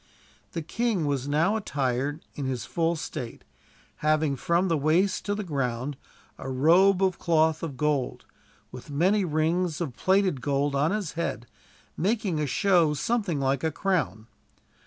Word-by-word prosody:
The 165 - -3
king 210 0 -1
was 140 -2 -1
now 160 +8 +2
attired 140 - -2
in 140 - -4
his 130 -2 -3
full 170 0 0
state; 125 -6 -6 0.5
having, 155 -2 +1
from 170 +7 +1
the 165 - +2
waist 160 +7 +1
to 205 - 0
the 210 - -3
ground, 135 -4 -2 0.4
a - - -6
robe 180 +9 +4
of 185 -2 +1
cloth 160 -1 +2
of 150 -6 -5
gold; 150 -2 -1 0.5
with - - -10
many 185 +8 +2
rings 160 0 0
of 160 -8 -3
plated 190 -7 +2
gold 140 0 0
on 140 +3 +2
his 200 -5 -2
head, 165 -7 -3 0.5
making 195 -3 0
a 150 - 0
show 170 -1 +3
something 190 - -1
like 135 -1 0
a 160 - +2
crown. 155 - -1
155 Hz, 155 wpm, -27 LUFS, 140-185 Hz, 0.5 s, robe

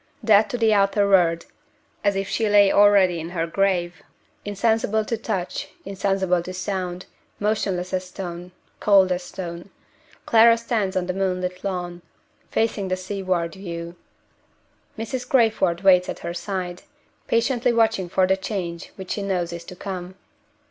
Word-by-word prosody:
Dead 215 -1 +5
to 245 - -2
the 225 -2 +3
outer 200 0 +3
world, 170 -4 +3 0.6
as 200 -1 +2
if 195 0 -2
she 220 0 0
lay 205 -1 +6
already 200 -4 +5
in 165 +1 -6
her 170 -2 -2
grave 180 0 0 0.4
insensible 220 +1 0
to 230 - -1
touch, 205 -5 -3 0.2
insensible 195 -2 0
to 185 +2 -7
sound, 185 -1 -4 0.3
motionless 195 -4 -1
as 185 0 -1
stone, 180 -1 -7 0.3
cold 195 -3 +5
as 180 0 0
stone 175 0 -7 0.6
Clara 230 0 +6
stands 215 -5 -1
on 180 - 0
the 185 - -2
moonlit 185 -1 -2
lawn, 175 -3 -4 0.5
facing 220 -3 0
the 185 0 -1
seaward 185 -3 -2
view. 170 -3 -7 1.0
Mrs. 250 +3 -5
Crayford 220 -8 +2
waits 180 -2 +5
at - - -4
her 170 - -3
side, 180 0 -4 0.5
patiently 240 +1 +1
watching 225 -6 +1
for 185 +1 +3
the 190 +1 +2
change 190 -4 -5
which 190 -2 -8
she 205 - -2
knows 180 -3 -2
is 170 0 -7
to 180 - -10
come. 185 -1 -6
190 Hz, 150 wpm, -23 LUFS, 180-205 Hz, 1.0 s, lay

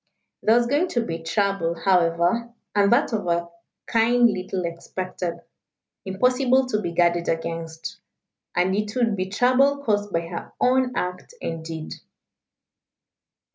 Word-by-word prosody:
There 220 - +4
was 240 - +3
going 290 +8 +1
to 235 -8 -1
be 165 -3 -4
trouble, 170 0 0
however, 175 +5 +2 0.2
and 200 -1 +3
that 240 - +3
of 205 -4 -1
a 170 0 0 0.4
kind 235 +1 +4
little 185 -1 -3
expected, 175 +1 -5 0.6
impossible 250 +6 +2
to 210 -3 0
be 175 - -3
guarded 170 0 +2
against. 165 0 -4 0.6
And 185 +2 +2
it 210 +2 -2
would 235 -4 +2
be 185 -1 -2
trouble 255 +7 +3
caused 205 -4 0
by 165 - +1
her 170 +1 -7
own 255 0 +2
act 180 - -4
and 165 -1 -4
deed. 160 -1 -6
190 Hz, 135 wpm, -24 LUFS, 170-235 Hz, 0.6 s, There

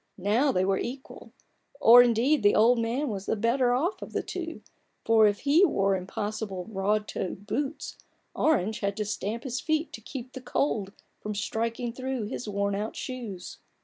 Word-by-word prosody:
Now 215 +9 +2
they 185 -4 +1
were 195 0 +1
equal: 260 +3 -7 0.5
or 245 -2 +9
indeed 245 +5 +3
the 205 0 +4
old 230 +3 +5
man 240 +6 -1
was 200 -2 -5
the - - +1
better 240 +3 +2
off 315 - 0
of - - -8
the - - -1
two: 330 -3 -6 0.4
for 220 -1 +6
if 205 0 -1
he 295 +6 +4
wore 195 - +3
impossible 205 0 -4
broad 210 +1 -1
toed 190 +2 -5
boots, 275 +7 -3 0.3
Orange 220 - +1
had 200 -1 -2
to 210 - -1
stamp 215 +3 -3
his 255 -2 -3
feet 315 0 -1
to 225 - -8
keep 255 +2 -8
the 260 - -7
cold 220 -6 -1 0.3
from 210 0 -5
striking 230 +3 -2
through 260 -1 -3
his 215 +1 -5
worn 200 0 -1
out 210 +2 -3
shoes. 230 -9 -6
225 Hz, 180 wpm, -27 LUFS, 205-260 Hz, 0.5 s, or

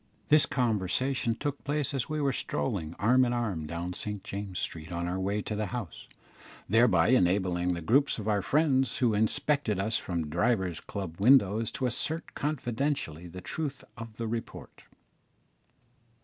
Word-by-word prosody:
This 150 0 +6
conversation 120 +1 0
took 145 +2 -4
place 145 0 -1
as 135 -4 -2
we 155 0 -2
were 140 -2 +1
strolling 85 -11 -2
arm 125 +5 +4
in 120 -1 +1
arm 100 -10 -2
down 85 +3 -4
St 105 +2 -4
James's 100 -2 -5
Street 80 +2 -1
on 85 0 -2
our 90 +2 -2
way 100 +2 -1
to 105 - -3
the 105 0 -2
House, 100 -4 -6 0.6
thereby 110 -6 +4
enabling 90 -5 +2
the 85 - -5
groups 135 - +3
of 110 -2 -5
our 105 -2 +2
friends 135 - +2
who 120 -4 +2
inspected 110 +2 +1
us 110 +3 0
from 85 -4 -3
divers 95 -2 +1
club 95 -4 -6
windows 115 -2 +5
to 130 - -2
assert 155 +7 -2
confidently 125 - -2
the 90 +2 -9
truth 140 - -4
of 115 -1 -9
the 115 - -3
report. 115 +1 -6
110 Hz, 160 wpm, -29 LUFS, 90-130 Hz, 0.6 s, This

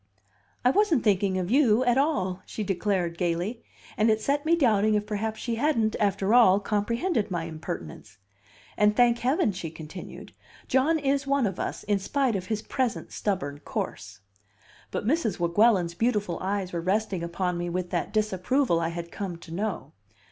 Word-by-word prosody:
"I 250 - +6
wasn't 345 - +2
thinking 195 -2 +2
of 185 +2 -2
you 250 -3 +4
at 245 -2 +3
all!" 190 - 0
she 215 - -4
declared 185 -3 -1
gayly; 180 +7 -1 0.3
and 220 0 +3
it 215 0 +3
set 285 +6 -1
me 335 - +5
doubting 215 -8 +3
if 210 0 0
perhaps 215 +1 -3
she 235 -2 -3
hadn't, 230 -5 +1
after 200 0 +1
all, 205 -6 +6
comprehended 225 - -1
my 175 -3 -2
impertinence. 110 - -7 0.6
"And, 210 0 +4
thank 240 0 +4
Heaven!" 255 -3 +2
she 180 -3 -5
continued, 160 +3 -10 0.3
"John 275 +6 +3
is 275 -1 0
one 275 -2 +2
of 190 -3 -3
us, - - -4
in 205 -1 +1
spite 255 +4 0
of 185 -1 -4
his 215 0 -2
present 255 -2 -2
stubborn 160 -9 -2
course." 100 -8 -5 0.7
But - - -4
Mrs. 275 -3 +1
Weguelin's 175 0 +3
beautiful 210 -3 0
eyes 190 -1 -2
were 170 - -2
resting 190 0 0
upon 175 +1 -2
me 175 0 -2
with 180 0 -3
that - - -2
disapproval 215 0 +1
I 165 0 -1
had 170 0 -6
come 190 -4 -5
to 165 -1 -11
know. 190 -7 -3
205 Hz, 170 wpm, -27 LUFS, 180-240 Hz, 0.7 s, I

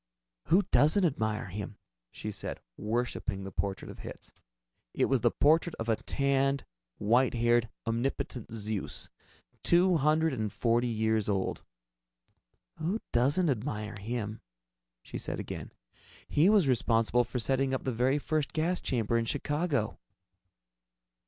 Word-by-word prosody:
"Who 190 +5 +4
doesn't 160 +6 +5
admire 110 - -1
him?" 100 +2 -6 0.3
she - - -6
said, - - -5 0.2
worshiping 110 - -2
the 95 - -6
portrait 95 0 -3
of - - -12
Hitz. - - -10 0.6
It - - +3
was 135 -3 +2
the 120 - +4
portrait 160 +6 +3
of 115 0 -4
a 110 - +4
tanned, 140 +2 0 0.3
white 120 +5 +3
haired, 120 0 +3 0.2
omnipotent 120 0 -2
Zeus, 105 -2 -4 0.5
two 175 - +4
hundred 155 +1 +3
and 110 -4 -2
forty 120 +1 +1
years 110 -2 +1
old. 95 -2 -1 1.2
"Who 175 +8 -1
doesn't 140 +9 +3
admire 105 -3 -3
him?" 110 0 -4 0.6
she - - -6
said - - -3
again. - - -6 0.6
"He 160 +6 +4
was 205 -8 +5
responsible 120 -1 +3
for 120 +2 -5
setting 135 +2 +1
up 130 - -1
the 130 - -1
very 125 +5 +2
first 150 0 -1
gas 170 +3 0
chamber 115 -2 +1
in 115 - -1
Chicago." 145 -2 -1
120 Hz, 135 wpm, -30 LUFS, 110-145 Hz, 1.2 s, doesn't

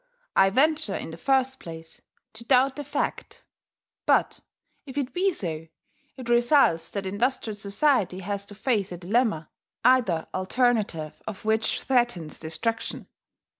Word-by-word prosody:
I 195 - +6
venture, 295 -1 +2
in - - -5
the - - -7
first 265 +7 +1
place. 165 -1 -10 0.3
to 220 +1 -9
doubt 260 +2 +3
the 290 - -5
fact; 285 - -3 0.6
but, - - +3 0.5
if 265 +1 -8
it 275 -2 -2
be 385 +2 +2
so, 165 - -4 0.5
it 255 -2 -8
results 240 - +4
that 200 -1 -4
industrial 220 +3 -1
society 200 -2 +1
has 200 +1 -3
to 205 - -11
face 210 -4 0
a 175 - -5
dilemma, 190 -2 0 0.3
either 225 -11 +4
alternative 190 - 0
of 215 -1 -7
which 220 0 +1
threatens 240 - 0
destruction. 225 +9 -3
220 Hz, 135 wpm, -26 LUFS, 185-255 Hz, 0.6 s, I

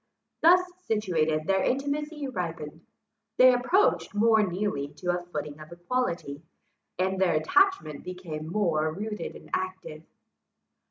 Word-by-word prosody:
Thus 355 +3 +7 0.3
situated, 160 -8 0
their 190 +1 +2
intimacy 290 +2 -2
ripened; 165 - -5 0.5
they 255 0 +8
approached 250 - +2
more 220 +1 +4
nearly 185 -7 -1
to 180 +2 -1
a 175 - -3
footing 150 -3 -6
of 155 +1 -12
equality; 175 - -3 0.6
and 190 +1 0
their 175 -4 +3
attachment 155 - +2
became 170 -4 -6
more 165 -6 +1
rooted 210 +5 -5
and - - -14
active. 185 -4 -4
185 Hz, 120 wpm, -27 LUFS, 155-230 Hz, 0.6 s, they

